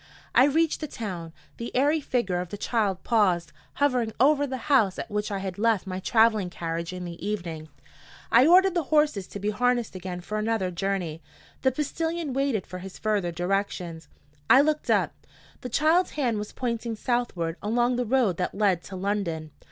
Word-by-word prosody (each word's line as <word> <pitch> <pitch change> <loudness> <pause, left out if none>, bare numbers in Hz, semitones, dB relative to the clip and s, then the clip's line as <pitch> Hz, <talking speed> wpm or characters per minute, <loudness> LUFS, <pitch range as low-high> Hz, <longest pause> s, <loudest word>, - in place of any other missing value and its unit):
I 255 - +7
reached 315 +2 +2
the 305 - -4
town. 180 - -6 0.3
The 235 - -5
airy 295 +4 +3
figure 235 -10 -1
of 180 - -7
the 205 - -6
child 205 -4 -1
paused, 185 -8 +2 0.2
hovering 250 -6 +1
over 285 +2 +4
the 260 -1 -3
house 230 -10 +3
at - - -6
which 210 +1 -1
I 200 - -1
had 190 0 -5
left 225 -4 +2
my 185 -1 -4
traveling 220 -1 +3
carriage 170 0 -4
in 180 -1 -6
the 170 0 -8
evening. 170 -6 -4 0.6
I 245 +5 +6
ordered 370 +2 +6
the 345 -4 0
horses 300 -11 +2
to 205 - -7
be 205 +2 -1
harnessed 245 +2 +1
again 180 -1 -6
for 210 +4 -3
another 215 -4 0
journey. 175 -3 -2 0.4
The 260 - +3
postilion 320 +2 -2
waited 270 -7 0
for 185 - -8
his 190 0 -9
further 205 -5 0
directions. 175 -2 -2 0.4
I 265 - +8
looked 305 +1 0
up. - - +2 0.5
The 250 - -6
child's 320 +8 +3
hand 240 -7 +1
was 210 - -6
pointing 235 -2 -3
southward, 210 -9 -1
along 240 +3 +1
the 250 - +1
road 230 -8 +2
that 180 - -2
led 195 -4 +2
to 195 - -8
London. 180 -5 -2
210 Hz, 185 wpm, -26 LUFS, 185-255 Hz, 0.6 s, I